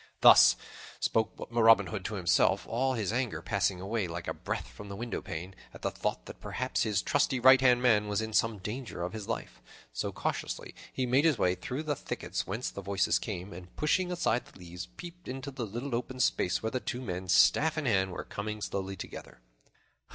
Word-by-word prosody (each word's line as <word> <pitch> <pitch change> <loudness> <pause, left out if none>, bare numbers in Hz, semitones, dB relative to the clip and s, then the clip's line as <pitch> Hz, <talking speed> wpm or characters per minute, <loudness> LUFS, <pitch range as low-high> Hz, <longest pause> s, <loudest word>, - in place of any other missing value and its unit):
Thus - - +9 0.4
spoke 110 -1 +1 0.2
Robin 115 -1 +6
Hood 105 -4 -5
to 110 - -3
himself, 95 +1 +2
all 130 +3 0
his 110 -3 -1
anger 120 -10 -1
passing 90 +1 0
away 100 +1 -2
like 85 0 -6
a - - -1
breath - - -4
from 105 0 -11
the 100 - -6
windowpane, 95 -5 -5 0.2
at - - -12
the - - 0
thought - - -3
that - - -11
perhaps 130 +1 -2
his 105 -4 +1
trusty 140 -2 +1
right 130 +1 +7
hand 125 -1 +4
man 105 -4 +4
was 105 0 0
in 110 0 -3
some 115 0 +2
danger 105 -2 -5
of 90 - -4
his 110 -2 -6
life. 115 - -5 0.3
So - - -2
cautiously - - -3 0.2
he 130 - -1
made 130 +4 +3
his 155 -6 +4
way 90 - +2
through 125 +10 -5
the 150 -2 -1
thickets - - -4
whence 110 +7 -3
the 100 - -7
voices 100 0 +1
came, 95 -2 -5
and, 90 +1 -11
pushing 180 +4 +1
aside 170 -9 0
the - - -17
leaves, 90 -1 -8
peeped 175 0 -11
into 135 +2 -5
the 125 -4 -4
little 120 +6 -5
open 125 +2 -3
space 90 -7 +1
where 110 - -1
the 130 - -1
two 125 0 -4
men, 95 -4 -4
staff 155 - +4
in 155 - -1
hand, 95 -6 +2
were - - -5
coming 105 +1 -5
slowly 95 -1 -3
together. - - -9
110 Hz, 205 wpm, -30 LUFS, 95-130 Hz, 0.4 s, Thus